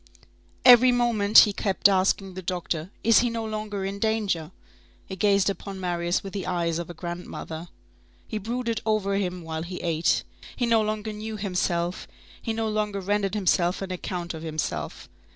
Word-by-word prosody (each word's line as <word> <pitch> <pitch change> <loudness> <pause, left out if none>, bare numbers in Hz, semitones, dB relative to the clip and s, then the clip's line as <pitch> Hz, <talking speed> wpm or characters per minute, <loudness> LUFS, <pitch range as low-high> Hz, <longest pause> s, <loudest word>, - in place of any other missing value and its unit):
Every 250 0 +9
moment, 230 -4 +3
he 205 - -2
kept 195 0 +3
asking 195 0 +1
the 185 - -6
doctor: 175 -2 -3
"Is 230 -1 +6
he 240 - +2
no 230 -1 -3
longer 215 -2 -4
in 195 +1 -4
danger?" 205 -8 0 0.6
He 190 - -7
gazed 200 0 +3
upon 195 -1 -4
Marius 175 -1 -1
with 195 - -7
the 195 -2 -4
eyes 170 -2 0
of 170 - -5
a 175 - -8
grandmother. 170 -1 -6 0.6
He 215 - -3
brooded 230 +1 -2
over 210 -3 +1
him 180 -3 -2
while 160 0 -4
he 180 +2 -6
ate. 165 -1 +1 0.3
He 245 - 0
no 230 -1 +4
longer 215 0 -2
knew 215 +1 -5
himself, 180 -3 -1 0.3
he 230 - -2
no 225 0 -1
longer 210 -2 -1
rendered 200 +1 0
himself 180 -3 +2
an 190 - -5
account 175 -1 -4
of 160 - -7
himself. 155 -1 -4
195 Hz, 170 wpm, -26 LUFS, 175-215 Hz, 0.6 s, Every